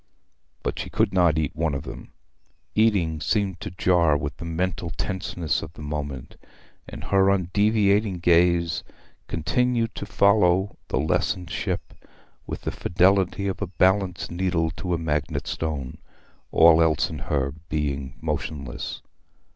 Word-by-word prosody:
But - - -2
she - - -4
could - - +1
not 85 -4 +4
eat 75 -2 -1
one 80 -3 0
of 70 - -4
them; 65 - -9 0.6
eating 100 -8 +2
seemed 100 -4 0
to - - -5
jar 85 -4 +3
with 70 0 -4
the 85 - -7
mental 85 +1 -2
tenseness 90 -2 -2
of 80 - -8
the 75 - -10
moment; 75 -3 -5 0.5
and - - -8
her 95 -1 +3
undeviating 100 +1 +2
gaze 85 -1 +3 0.4
continued 115 +8 0
to 100 - -6
follow 100 -2 +3
the - - -1
lessened 80 +4 0
ship - - -3 0.5
with - - -5
the - - -3
fidelity 95 +2 +2
of 95 - -3
a 100 - -1
balanced 95 0 +1
needle 85 -2 0
to 90 +2 -2
a - - -1
magnetic 75 -3 -2
stone, 75 -6 -4 0.5
all 80 0 +7
else 80 -3 +2
in - - -5
her 70 -2 -1 0.2
being 70 -3 -2
motionless. 70 -6 -4
85 Hz, 140 wpm, -24 LUFS, 75-95 Hz, 0.6 s, all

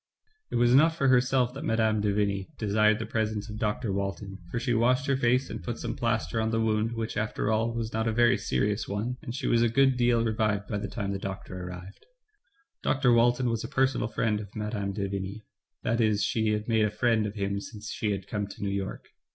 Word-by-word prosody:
*' 435 0 -43
It - - -2
was 120 0 +4
not 160 +5 +5
for 135 -5 +2
herself 125 -1 +3
that 135 +3 -7
Mme. 110 -5 +2
de 105 0 +1
Vigny 100 -2 0
desired 110 0 +3
the 110 - -4
presence 110 -1 -2
of 105 - -6
Dr. 105 -2 -1
Walton, 100 0 -4
for 115 - -2
she 120 0 0
washed 125 +4 +2
her 140 - +2
face, 125 +1 +2
and - - -7
put 120 -1 -4
some 115 -1 -4
plaster 115 -1 0
on 110 - 0
the 115 0 0
wound, 110 0 +1
which, 115 -1 -3
after 105 0 -1
all, 115 +2 +1
was 115 -1 -4
not 110 +1 0
a - - +2
very 120 +1 +4
serious 100 - -1
one, 110 +5 -3
and 125 -6 -6
she 135 -1 -4
was 115 - +3
a 120 - +4
good 135 +2 +3
deal 120 -1 +3
revived 110 -2 0
by 105 - -2
the - - -4
time 100 -3 -3
the 100 - -3
doctor 95 -2 -6
arrived. 90 +2 -10 0.7
Dr. 130 -3 +3
Walton 120 +2 +3
was 115 -2 -1
a - - -4
personal 135 -2 +1
friend 110 -1 0
of 105 -2 -7
Mme. 105 -2 -2
de 100 0 -2
Vigny, 100 +2 -5 0.4
that 115 +1 +1
is 105 -2 +2
she 110 +2 +1
had 105 0 -2
made 110 -2 +3
a - - +1
friend 110 0 +1
of 105 - -7
him 100 -1 -1
since 105 0 -8
she 105 - -2
had 100 -2 -2
come 105 -1 -2
to 100 - -9
New 100 - -1
York. 100 0 -4
110 Hz, 235 wpm, -28 LUFS, 105-120 Hz, 0.7 s, not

